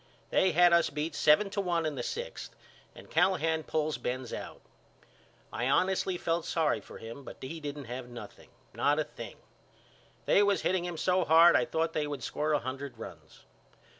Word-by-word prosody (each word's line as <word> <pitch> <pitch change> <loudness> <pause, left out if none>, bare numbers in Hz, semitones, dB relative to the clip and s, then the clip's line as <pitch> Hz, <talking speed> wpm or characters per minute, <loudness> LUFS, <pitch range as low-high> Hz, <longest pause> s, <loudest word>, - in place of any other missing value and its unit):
They 190 - +3
had 175 +1 +6
us 170 -1 +4
beat 150 +2 -3
seven 195 +9 +4
to 200 - -1
one 170 -3 0
in 155 - -1
the 130 - -4
sixth 485 - -6 0.4
and - - -13
Callahan 165 -4 +2
pulls 155 -3 -2
Benz 125 0 -4
out. - - -7 0.9
I 125 +2 -1
honestly 185 +3 +1
felt 170 -1 -1
sorry 155 -9 +1
for - - -12
him 115 +5 -9
but - - -10
he 150 +5 -6
didn't 145 -2 -6
have 120 +1 -6
nothing, 120 -1 -11 0.2
not - - +2
a - - +2
thing. - - -10 0.9
They - - +5
was 200 -1 +2
hitting 180 -1 +1
him 175 -2 -4
so 185 +2 +2
hard 165 +2 +7
I - - +4
thought 165 0 -1
they 150 -1 -1
would 145 -2 -5
score 155 +1 -1
a 145 - +3
hundred 135 +2 -6
runs. - - -11
160 Hz, 185 wpm, -30 LUFS, 140-175 Hz, 0.9 s, hard